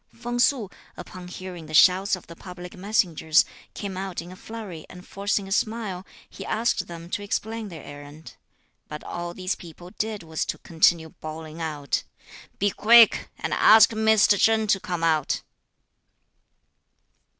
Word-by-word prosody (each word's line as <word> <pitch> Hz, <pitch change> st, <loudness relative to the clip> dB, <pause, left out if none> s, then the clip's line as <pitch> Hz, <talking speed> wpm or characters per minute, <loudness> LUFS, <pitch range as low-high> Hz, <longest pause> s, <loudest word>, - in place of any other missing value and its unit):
Feng 240 Hz, +1 st, -4 dB
Su, 240 Hz, -4 st, +3 dB, 0.3 s
upon 180 Hz, 0 st, -9 dB
hearing 180 Hz, -2 st, -8 dB
the 155 Hz, -, -4 dB
shouts 190 Hz, +4 st, +5 dB
of 185 Hz, -, -13 dB
the 170 Hz, -, -12 dB
public 180 Hz, 0 st, -10 dB
messengers, 180 Hz, -5 st, +2 dB, 0.3 s
came 200 Hz, -2 st, -5 dB
out 190 Hz, -1 st, -4 dB
in 175 Hz, +1 st, -8 dB
a -, -, -10 dB
flurry 200 Hz, -6 st, -8 dB
and 180 Hz, 0 st, -12 dB
forcing 200 Hz, 0 st, -2 dB
a -, -, -10 dB
smile, 210 Hz, -3 st, -2 dB, 0.2 s
he -, -, -10 dB
asked 230 Hz, +2 st, -1 dB
them 170 Hz, -1 st, -9 dB
to -, -, -2 dB
explain 220 Hz, +2 st, -3 dB
(their 160 Hz, -5 st, -10 dB
errand); 145 Hz, +2 st, -11 dB, 0.5 s
but 150 Hz, 0 st, -8 dB
all 175 Hz, 0 st, -6 dB
these 185 Hz, 0 st, -2 dB
people 175 Hz, +1 st, -12 dB
did 215 Hz, -3 st, -2 dB
was 160 Hz, -1 st, -3 dB
to -, -, -4 dB
continue 165 Hz, 0 st, +2 dB
bawling 155 Hz, +1 st, -9 dB
out: 150 Hz, -3 st, -2 dB, 0.6 s
"Be 205 Hz, 0 st, +1 dB
quick, 230 Hz, +2 st, +6 dB
and -, -, -3 dB
ask 220 Hz, +1 st, +7 dB
Mr. 220 Hz, -2 st, +4 dB
Chen 220 Hz, 0 st, +3 dB
to 200 Hz, -2 st, +2 dB
come 175 Hz, -3 st, -4 dB
out." 155 Hz, -3 st, +1 dB
185 Hz, 155 wpm, -25 LUFS, 165-210 Hz, 0.6 s, ask